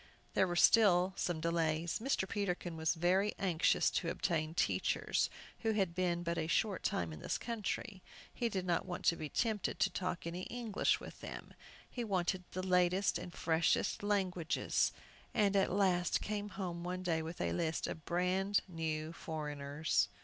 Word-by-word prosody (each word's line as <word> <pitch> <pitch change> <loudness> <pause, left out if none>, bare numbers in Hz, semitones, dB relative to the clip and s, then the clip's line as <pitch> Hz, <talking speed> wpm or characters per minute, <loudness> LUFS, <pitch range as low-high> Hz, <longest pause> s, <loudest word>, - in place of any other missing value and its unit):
There 190 - +3
were 175 - -2
still 185 -2 +5
some 175 -4 -1
delays. 165 0 0
Mr. 230 -5 0
Peterkin 180 -5 -2
was 160 +1 +1
very 185 +5 +2
anxious 180 -3 +2
to 170 - -1
obtain 160 -2 -1
teachers - - +1 0.3
who 225 -1 +1
had 195 -5 +1
been 175 -1 0
but 170 0 -1
a 160 - -1
short 190 +4 +1
time 85 -2 -1
in 75 - -8
this - - -2
country. 215 -3 -4 0.3
He 235 - -1
did 190 -4 -2
not 175 0 0
want 180 - -5
to 170 - +5
be 155 -2 -5
tempted 220 - -1
to 195 - +3
talk 180 -2 -3
any 175 +2 -4
English 235 -4 0
with - - -10
them. - - -8 0.3
He 245 - -4
wanted 185 -3 0
the 185 - -4
latest 180 +1 +3
and 180 - -7
freshest 165 -1 +1
languages, 190 -5 +1 0.4
and 205 -3 +3
at 195 - +3
last 180 -2 +2
came 210 0 -3
home 175 -4 -4
one 180 +1 -3
day 165 -3 +1
with 165 +2 -6
a - - 0
list 165 -2 -1
of 160 - -5
"brand 185 +4 +1
new 160 -2 -3
foreigners." 150 -1 -1
180 Hz, 170 wpm, -35 LUFS, 165-195 Hz, 0.4 s, still